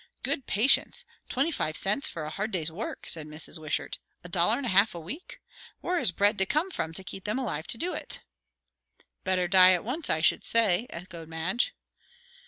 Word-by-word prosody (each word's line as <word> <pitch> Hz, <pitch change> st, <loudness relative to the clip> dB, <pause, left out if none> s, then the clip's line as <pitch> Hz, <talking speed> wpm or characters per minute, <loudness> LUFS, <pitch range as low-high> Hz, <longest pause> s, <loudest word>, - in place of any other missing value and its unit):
"Good 270 Hz, -, -1 dB
patience! 275 Hz, -, +3 dB, 0.2 s
Twenty 275 Hz, +6 st, +1 dB
five 155 Hz, -, -1 dB
cents 210 Hz, +8 st, +1 dB
for 165 Hz, -, -6 dB
a 150 Hz, -, -5 dB
hard 205 Hz, +6 st, -3 dB
day's 165 Hz, -6 st, -1 dB
work!" 200 Hz, +8 st, -6 dB
said 155 Hz, -2 st, -1 dB
Mrs. 155 Hz, +2 st, -6 dB
Wishart. 155 Hz, -1 st, -3 dB, 0.2 s
"A 175 Hz, -, -10 dB
dollar 175 Hz, +6 st, +3 dB
and 280 Hz, -, -4 dB
a -, -, -1 dB
half 200 Hz, +1 st, +4 dB
a -, -, -5 dB
week! 200 Hz, -, -9 dB, 0.4 s
Where 360 Hz, -1 st, 0 dB
is 185 Hz, -, +2 dB
bread 205 Hz, +4 st, +3 dB
to 190 Hz, -, +2 dB
come 320 Hz, -, 0 dB
from, 160 Hz, -, -3 dB
to 190 Hz, -, -5 dB
keep 190 Hz, +1 st, -8 dB
them 210 Hz, +4 st, -1 dB
alive 190 Hz, -, -3 dB
to -, -, +3 dB
do 355 Hz, +9 st, -2 dB
it?" -, -, -5 dB, 1.0 s
"Better 185 Hz, -2 st, +1 dB
die 185 Hz, 0 st, +8 dB
at 180 Hz, -, 0 dB
once, 270 Hz, +7 st, -3 dB
I 160 Hz, -, +1 dB
should -, -, +3 dB
say," 225 Hz, -1 st, +3 dB
echoed 170 Hz, -2 st, -9 dB
Madge. 185 Hz, -, -1 dB
190 Hz, 200 wpm, -28 LUFS, 170-245 Hz, 1.0 s, die